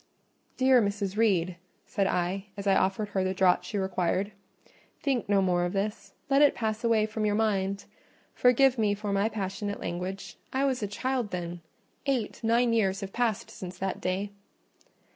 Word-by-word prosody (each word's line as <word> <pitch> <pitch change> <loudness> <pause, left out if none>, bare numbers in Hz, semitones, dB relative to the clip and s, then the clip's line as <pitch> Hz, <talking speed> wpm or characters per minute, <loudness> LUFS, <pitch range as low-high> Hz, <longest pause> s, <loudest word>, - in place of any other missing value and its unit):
"Dear 260 -1 +5
Mrs. 200 -1 -1
Reed," 185 -6 +2 0.3
said 195 -1 0
I, 180 +2 -1
as 200 - -5
I 195 - +4
offered 195 +2 +1
her 190 -2 0
the 185 0 -1
draught 185 -1 +3
she 210 - -3
required, 190 +1 0 0.7
"think 260 -8 -1
no 200 -1 +4
more 175 -1 +2
of 175 +2 -2
all 195 - +3
this, 215 +1 -7
let 275 +1 +4
it 290 - +6
pass 220 0 -2
away 225 -2 +3
from 220 0 -4
your 210 -1 +2
mind. 200 -2 0 0.5
Forgive 250 0 +4
me 205 -2 +2
for 205 0 -3
my 200 +2 +2
passionate 205 0 -4
language: 180 +3 -5
I 270 +1 +1
was 260 -3 0
a 205 - -1
child 250 +2 -2
then; 175 -1 -5 0.5
eight, 250 -4 -1
nine 230 +1 +3
years 195 -4 +1
have 195 -1 -6
passed 235 -4 -1
since 180 -1 -8
that 190 0 -3
day." 190 +3 -1
205 Hz, 180 wpm, -28 LUFS, 190-225 Hz, 0.7 s, it